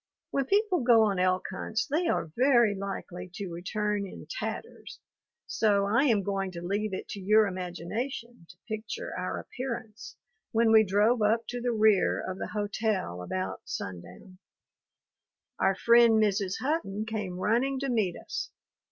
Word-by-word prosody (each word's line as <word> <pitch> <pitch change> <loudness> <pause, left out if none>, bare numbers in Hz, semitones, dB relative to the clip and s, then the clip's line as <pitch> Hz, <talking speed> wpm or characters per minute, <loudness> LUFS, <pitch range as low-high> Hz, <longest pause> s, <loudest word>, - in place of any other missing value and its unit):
When 275 -1 0
people 400 +1 +2
go 235 -2 +6
on 200 -4 +1
elk 185 0 +2
hunts 215 +3 -2
they 315 +4 0
are 165 - -1
very 240 -4 +4
likely 190 -2 -6
to 195 -3 -5
return 200 +4 -2
in - - -10
tatters, - - -6 0.5
so 200 -2 +2
I 230 +8 +3
am 220 -7 +3
going 195 0 -1
to 170 - -6
leave 205 +3 -1
it 190 - -5
to 200 - -5
your 215 +3 +4
imagination 190 +4 -5
to 180 - -14
picture 220 - -5
our - - -3
appearance 235 -4 -6 0.4
when 225 0 +4
we 220 0 +7
drove 210 +4 +2
up 225 +2 +2
to 245 0 -4
the 245 0 0
rear 215 -3 +3
of 185 0 -5
the - - -3
hotel 205 - -2
about 95 +1 -4
sundown. 95 - -8 1.2
Our 195 - +3
friend 235 +3 +6
Mrs. 205 -3 +2
Hutton 255 -8 -1
came 210 -5 -4
running 245 +8 +1
to 275 - -1
meet 215 -8 +1
us. - - -5
210 Hz, 155 wpm, -28 LUFS, 190-235 Hz, 1.2 s, we